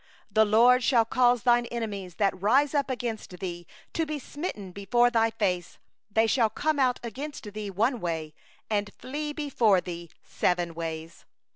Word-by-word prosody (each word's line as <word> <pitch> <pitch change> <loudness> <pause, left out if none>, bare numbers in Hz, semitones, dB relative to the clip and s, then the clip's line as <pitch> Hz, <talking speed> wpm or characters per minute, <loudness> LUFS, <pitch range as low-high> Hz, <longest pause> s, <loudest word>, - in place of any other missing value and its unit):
7The 220 0 +4
LORD 245 +4 +6
will 230 -3 +4
cause 245 0 +3
thine 240 -1 +4
enemies 205 -7 -5
that 195 -2 0
rise 270 +9 +3
up 285 -2 +1
against 230 -7 -4
thee 175 -2 -6 0.3
to 330 - 0
be 305 0 -3
smitten 275 - -6
before 240 +6 +2
thee; 220 -6 +1 0.5
they 220 +2 +3
shall 225 0 +3
come 300 +7 -1
out 255 -2 +2
against 240 -2 -6
thee 210 -1 -5
one 230 +6 +1
way, 160 -4 -3 0.3
and 205 -1 0
shall - - -24
flee 295 +3 -4
before 250 - +2
thee 170 -2 -7
seven 175 -1 0
ways. 165 0 -6
220 Hz, 160 wpm, -27 LUFS, 185-250 Hz, 0.5 s, LORD